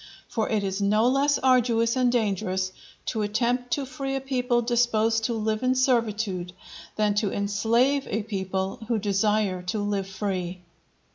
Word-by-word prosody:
For 220 - -2
it 215 -2 0
is 195 +1 -2
no 215 +3 +3
less 275 +3 +3
arduous 235 -3 +3
and 250 -1 +3
dangerous 190 -5 0 0.3
to 220 - -2
attempt 240 +4 0
to 280 - -1
free 270 +1 -4
a - - 0
people 250 -2 0
disposed 225 -2 +2
to 235 - 0
live 215 0 -1
in 255 0 +2
servitude, 220 -8 0 0.4
than 210 -1 +2
to 205 -1 0
enslave 230 +7 +1
a 215 +1 -2
people 190 -2 -3
who 230 -1 +1
desire 205 -2 +1
to 200 - -1
live 205 -2 -1
free. 185 -2 -3
220 Hz, 155 wpm, -26 LUFS, 200-245 Hz, 0.4 s, no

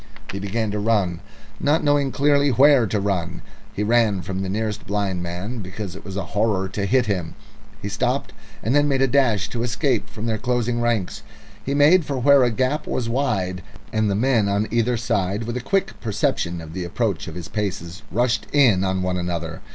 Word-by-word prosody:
He 100 - -5
began 105 +2 -2
to 105 - -2
run, 100 -5 +1 0.4
not 150 +3 +2
knowing 145 -2 +2
clearly 145 0 +3
where 135 -1 +5
to 105 +1 0
run. 95 -4 -2 0.3
He 105 - -2
ran 110 -4 +2
from 95 0 -3
the 95 - -3
nearest 105 +1 -3
blind 100 -3 -1
man, 90 +8 -5
because 100 -1 -6
it - - -10
was 95 0 -6
a 100 - -1
horror 105 -3 +1
to 100 +1 -2
hit 125 +3 +3
him. 90 -6 -2 0.5
He - - -2
stopped, - - -1 0.3
and 115 - +1
then 145 0 +4
made 135 -2 +2
a - - +4
dash 120 -7 +2
to 120 - -4
escape 120 0 0
from 110 +1 -7
their 110 -2 -1
closing 120 0 0
ranks. 115 -6 -1 0.4
He 140 - -2
made 155 +5 +6
for 140 -2 -3
where 140 +2 +5
a 125 - +3
gap 130 +6 -1
was 120 -3 -2
wide, 105 -9 -1 0.3
and 110 -1 +2
the 100 - +1
men 115 -2 +2
on 100 +2 +1
either 120 +1 +1
side, 105 -2 -1
with 120 +1 -4
a 125 - -2
quick 195 +9 0
perception 105 - -1
of 80 -1 -10
the 90 0 -3
approach 85 - -2
of - - -7
his 85 -2 -6
paces, 95 -3 -4
rushed 120 -1 +1
in 120 -10 +4
on 95 -1 0
one 90 0 -1
another. 85 -2 -3
110 Hz, 205 wpm, -22 LUFS, 95-125 Hz, 0.5 s, made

